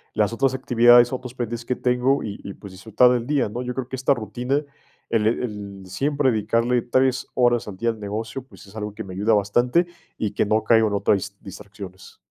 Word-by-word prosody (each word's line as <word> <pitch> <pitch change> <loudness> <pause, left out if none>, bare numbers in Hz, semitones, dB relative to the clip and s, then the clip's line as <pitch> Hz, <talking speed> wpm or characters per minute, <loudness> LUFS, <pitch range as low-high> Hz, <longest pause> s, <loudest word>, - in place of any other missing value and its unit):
las 105 +1 +1
otras 135 +2 +1
actividades, 120 -1 +5
otros 125 -1 -5
pendientes 120 -1 -4
que 125 - -1
tengo, 125 +3 +1
y 105 -1 -6
y, 100 - -7
pues, 100 -3 -12
disfrutar 110 +6 +3
del 120 -1 -1
día, 140 -7 +1
¿no? 120 +4 -5
Yo 125 0 -4
creo 130 -2 -3
que - - -4
esta 130 +2 +2
rutina, 125 +5 -2 0.5
el 110 -2 +2
el 105 -4 -3
siempre 140 +7 +1
dedicarle 115 +2 +1
3, 130 +2 +1
horas 120 -2 +2
al 100 - -6
día 115 +4 0
al 115 -2 -3
negocio, 110 +5 -4
pues, 130 - -16
es 100 - -16
algo 105 -1 -5
que 110 - -6
me 95 - -9
ayuda 105 +4 +1
bastante 120 - +2 0.3
y 105 - -2
que - - 0
no 110 +1 +1
caigo 110 0 +4
en 105 - -2
otras 100 0 +2
dis 100 +1 -7
distracciones. 95 -1 -11
115 Hz, 215 wpm, -23 LUFS, 105-125 Hz, 0.5 s, actividades